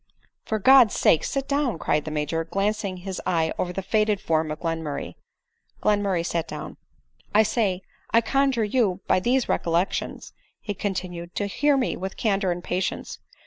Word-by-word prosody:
" - - -47
For 220 - 0
God's 250 +1 +6
sake 160 - +4
sit 275 -1 -2
down," 280 - 0
cried 150 -1 0
the - - -3
Major, 155 +2 -1
glancing 195 +2 -1
his 185 +1 -5
eye 165 -3 +1
over 180 - -1
the 195 +2 -4
faded 210 +1 +1
form 160 -3 0
of 155 0 -4
Glenmurray. 160 -3 -3 0.7
Glenmur 205 -2 +1
ray 170 -2 0
sat 170 -1 -2
down. - - -7 0.3
" - - -19
I 215 - +7
say, 200 -4 0 0.3
i 230 - +5
conjure 270 0 +1
you 205 -4 +1
by - - +3
these 245 +5 +1
recollections," 170 +3 -1 0.3
he 205 - -4
con 200 0 -3
tinued, 175 -2 -6
" - - -41
to 205 - -1
hear 285 +8 +2
me 255 - 0
with 190 +1 -6
candor 195 -4 +1
and 175 0 -4
patience. 180 +1 -3
195 Hz, 185 wpm, -25 LUFS, 170-220 Hz, 0.7 s, I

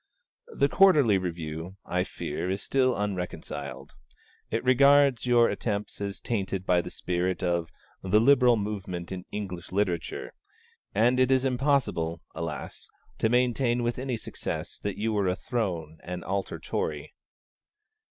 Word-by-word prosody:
The 140 - +2
'Quarterly 145 - +5
Review', 85 0 -5
I 90 0 0
fear, 90 0 -4
is 95 +1 -2
still 130 -2 +2
unreconciled. 90 -7 -4 0.6
It 115 - -1
regards 140 0 +5
your 120 -1 +5
attempts 105 -2 -3
as 100 -1 -3
tainted 95 -4 -2
by 90 -2 +3
the - - -7
spirit 90 +1 -2
of 85 -2 0 0.3
'The 95 +3 +3
Liberal 125 -1 +5
Movement 95 -4 -4
in 95 -1 -5
English 90 -5 -5
Literature;' 95 -4 -2 0.6
and 120 +5 +4
it 130 0 +4
is 130 0 +3
impossible, 125 - 0
alas! 80 -3 -6 0.3
to 110 - +2
maintain 120 0 +2
with 120 +1 -1
any 130 -2 -2
success - - -5
that 100 -1 -4
you 110 +1 0
were 100 -2 +1
a 90 - +1
Throne 90 -9 -3
and 90 0 -5
Altar 95 +1 -2
Tory. - - -3
100 Hz, 140 wpm, -27 LUFS, 90-125 Hz, 0.6 s, Quarterly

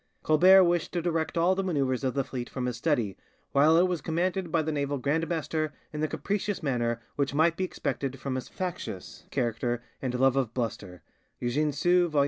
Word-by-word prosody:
Colbert 185 +5 +7
wished 175 -2 +1
to 175 - 0
direct 165 -1 -1
all 170 +3 +4
the 195 +1 -1
manoeuvres 140 -8 0
of 130 0 -1
the 135 - +1
fleet 125 -2 -5
from 130 -2 -3
his 125 -2 -2
study, 120 - 0 0.4
while 150 +4 +5
it 180 +2 +5
was 180 -3 -2
commanded 175 +2 -1
by 160 -1 +2
the 160 - -2
naval 145 -1 -1
grandmaster 155 +2 -1 0.2
in 150 - -4
the 155 - +2
capricious 200 +3 -2
manner 120 -4 0 0.2
which 140 -1 0
might 165 +2 +4
be 190 - -2
expected 135 -7 -3
from 135 0 -3
his 130 -1 -4
factious 185 -2 -6
character 120 +1 -1 0.2
and 125 -2 -2
love 135 0 +4
of 130 -5 -1
bluster 100 -7 -4 0.4
(Eugene 145 +5 0
Sue, 175 +4 +3
vol. 150 -2 +1
150 Hz, 195 wpm, -28 LUFS, 130-170 Hz, 0.4 s, Colbert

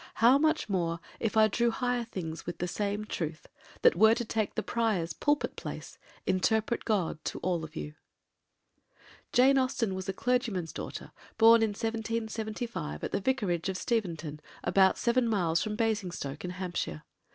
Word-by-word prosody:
How 245 +5 +6
much 310 +1 +2
more 170 -4 -1 0.2
If 225 -1 -1
I 215 0 +7
drew 235 +3 +1
higher 245 0 -1
things 165 -8 -6
with 175 - -4
the 180 - -2
same 205 +3 -2
truth! 155 -6 -4 0.4
That - - +6
were 220 +5 +6
to 240 - -3
take 220 -1 -1
the - - -1
Prior's 210 -9 0
pulpit 290 - 0
place, - - -7 0.3
Interpret 220 +5 +1
God 185 -8 0
to - - -3
all 175 -2 0
of 155 +1 -9
you. 150 - -5 1.4
Jane 265 +2 +5
Austen 255 -6 0
was 190 +1 -5
a - - 0
clergyman's 225 -7 -1
daughter, - - -6 0.3
born 230 0 +7
in 225 - +3
1775 225 - -3
at - - -2
the 200 - -1
Vicarage 190 -8 0
of 190 - -2
Steventon, 170 -10 -2 0.2
about 190 +1 +4
seven 240 0 +2
miles 175 -7 +1
from 215 0 -2
Basingstoke, 190 - -2
in 180 - -3
Hampshire. 180 - -4
210 Hz, 165 wpm, -30 LUFS, 175-230 Hz, 1.4 s, I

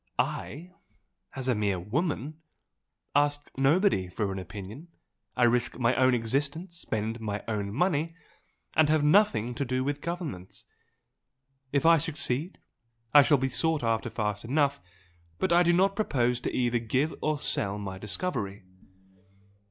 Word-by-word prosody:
I, 170 +6 -3 0.6
as 130 -1 -4
a 130 - +3
mere 100 -4 0
woman, 150 - -3 0.7
ask 145 0 +1
nobody 135 - +2
for 100 +2 -3
an 95 - -4
opinion 105 - -9 0.5
I 125 - +3
risk 120 0 +2
my 120 0 +2
own 130 -1 +4
existence 140 +9 -2
spend 110 -7 -3
my 105 -2 -4
own 105 -3 -2
money 165 - 0 0.6
and 155 -1 +4
have 155 -1 +3
nothing 150 - +3
to 130 - -2
do 130 0 -1
with 145 +1 -2
governments. 160 - -6 1.1
If 140 +2 +1
I 165 0 +7
succeed 150 +2 0 0.6
I 145 - +10
shall 145 +1 +4
be 135 0 0
sought 160 +2 +1
after 115 0 0
fast 105 -2 -3
enough! 140 +3 +1 0.6
but 185 - +1
I 175 - +6
do 175 -1 +4
not 190 +3 +3
propose 125 - +1
to - - -3
either 120 -1 +1
give 130 +7 0
or 155 0 0
sell 100 -6 -1
my 95 -2 -6
discovery." 100 - -3
130 Hz, 145 wpm, -28 LUFS, 110-155 Hz, 1.1 s, I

